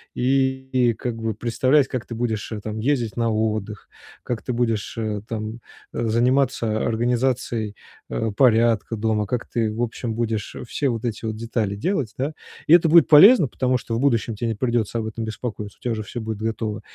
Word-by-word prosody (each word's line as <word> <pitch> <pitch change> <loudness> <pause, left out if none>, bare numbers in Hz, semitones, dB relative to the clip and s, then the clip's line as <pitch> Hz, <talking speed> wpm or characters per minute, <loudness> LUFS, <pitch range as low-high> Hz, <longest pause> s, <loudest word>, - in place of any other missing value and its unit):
и 130 -1 +1
как 120 -1 -3
бы 115 -2 -3
представлять, 130 +5 +2
как 125 -3 -4
ты 115 - -6
будешь, 110 -2 -2
э, 105 - -4
там 110 +1 -5
ездить 120 -4 0
на 115 -1 +1
отдых, 110 -1 -2 0.3
как 120 -2 -3
ты 125 - -3
будешь, 115 -3 -1
э, 110 -2 -2
там 110 0 -5 0.3
заниматься 120 -1 +1
организацией, 120 -2 0 0.3
э, 115 -1 -2
порядка 115 -2 +3
дома, 105 -1 0
как 120 +4 -3
ты 115 -2 -1
в 115 - -4
общем 115 -1 -4
будешь 115 -3 -2
все 140 +2 -1
вот 115 -1 -3
эти 115 -1 -3
вот 110 -1 -2
детали 110 -2 -2
делать, 130 - -1
да? 140 +4 -2 0.3
И 160 - +6
это 170 -1 +6
будет 165 -1 +7
полезно, 170 - +8
потому 130 +1 0
что 115 -2 -4
в - - -1
будущем 120 -4 +1
тебе 115 +2 -2
не 110 - -2
придется 120 -1 -1
об 110 - -3
этом 110 +1 -5
беспокоиться, 110 -2 -6
у - - -56
тебя 120 - -1
уже 110 - -4
все 115 +4 -6
будет 110 -1 -4
готово. 110 -1 -3
115 Hz, 190 wpm, -23 LUFS, 110-125 Hz, 0.3 s, полезно